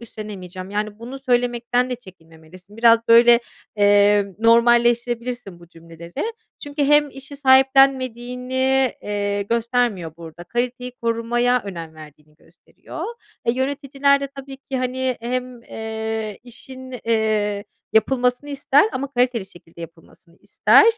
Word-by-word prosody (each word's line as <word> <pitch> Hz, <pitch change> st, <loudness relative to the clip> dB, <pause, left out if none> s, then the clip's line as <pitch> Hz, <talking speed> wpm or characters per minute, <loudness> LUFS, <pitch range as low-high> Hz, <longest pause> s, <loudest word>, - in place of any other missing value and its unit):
üstlenemeyeceğim. 195 Hz, -5 st, -9 dB
Yani, 210 Hz, +1 st, -3 dB
bunu 250 Hz, +4 st, -8 dB
söylemekten 245 Hz, -1 st, 0 dB
de -, -, -1 dB
çekinmemelisin. 180 Hz, -1 st, -17 dB
Biraz 230 Hz, 0 st, +6 dB
böyle, 235 Hz, +1 st, +7 dB, 0.4 s
eee, 205 Hz, 0 st, +4 dB
normalleştirebilirsin 235 Hz, -2 st, +2 dB
bu 170 Hz, -, -16 dB
cümleleri. 170 Hz, -, -7 dB, 0.3 s
Çünkü 290 Hz, -1 st, -2 dB
hem 295 Hz, 0 st, +4 dB
işi 270 Hz, +1 st, -10 dB
sahiplenmediğini, 260 Hz, -1 st, +2 dB
eee, 205 Hz, -1 st, -2 dB
göstermiyor 230 Hz, -, -1 dB
burada. 170 Hz, 0 st, -11 dB
Kaliteyi 250 Hz, +4 st, -3 dB
korumaya 240 Hz, +2 st, +1 dB
önem 165 Hz, -5 st, -7 dB
verdiğini 150 Hz, -1 st, -15 dB
gösteriyor. -, -, -11 dB, 0.4 s
E, 235 Hz, -, +2 dB
yöneticiler 280 Hz, +1 st, +1 dB
de, 280 Hz, -, -2 dB
tabii 275 Hz, 0 st, -10 dB
ki, 265 Hz, -1 st, -5 dB
hani, 255 Hz, 0 st, -2 dB
hem, 250 Hz, 0 st, -4 dB
eee, 220 Hz, -2 st, -5 dB
işin, 260 Hz, +2 st, -11 dB
eee, 215 Hz, -2 st, 0 dB, 0.3 s
yapılmasını 250 Hz, +5 st, +1 dB
ister 280 Hz, +3 st, +3 dB
ama 275 Hz, +2 st, -3 dB
kaliteli 245 Hz, -5 st, 0 dB
şekilde 170 Hz, -2 st, -17 dB
yapılmasını 170 Hz, +1 st, -14 dB
ister. -, -, +4 dB
235 Hz, 115 wpm, -21 LUFS, 205-255 Hz, 0.4 s, böyle